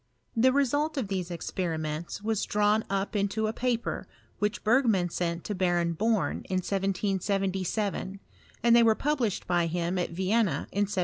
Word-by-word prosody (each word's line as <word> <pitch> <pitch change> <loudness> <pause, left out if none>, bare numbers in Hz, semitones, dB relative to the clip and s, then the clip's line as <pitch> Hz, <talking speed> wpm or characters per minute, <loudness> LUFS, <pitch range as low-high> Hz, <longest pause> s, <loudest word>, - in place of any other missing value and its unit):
The 250 +3 +5
result 290 +3 +1
of 235 -8 -2
these 185 -3 -2
experi 170 -1 -3
ments 155 +5 -4
was 220 -1 0
drawn 210 +1 +2
up 195 +2 -1
into 205 +2 0
a 215 - -1
paper, 240 -1 -2 0.3
which 210 0 -1
Bei^man 215 -7 +3
sent 170 -1 -2
to 210 - -3
Baron 175 -3 +1
Born 215 +3 +1
in 190 - -1
1777, 195 +1 -1 0.4
and 235 0 +6
they 235 - +7
were 225 -1 +5
pub 295 +3 0
lished 220 -6 -1
by 175 -1 +2
him 175 +2 -1
at 175 - -1
Vienna 190 -2 +1
in 205 +1 +1
1779. 200 - -2
195 Hz, 170 wpm, -28 LUFS, 180-220 Hz, 0.4 s, they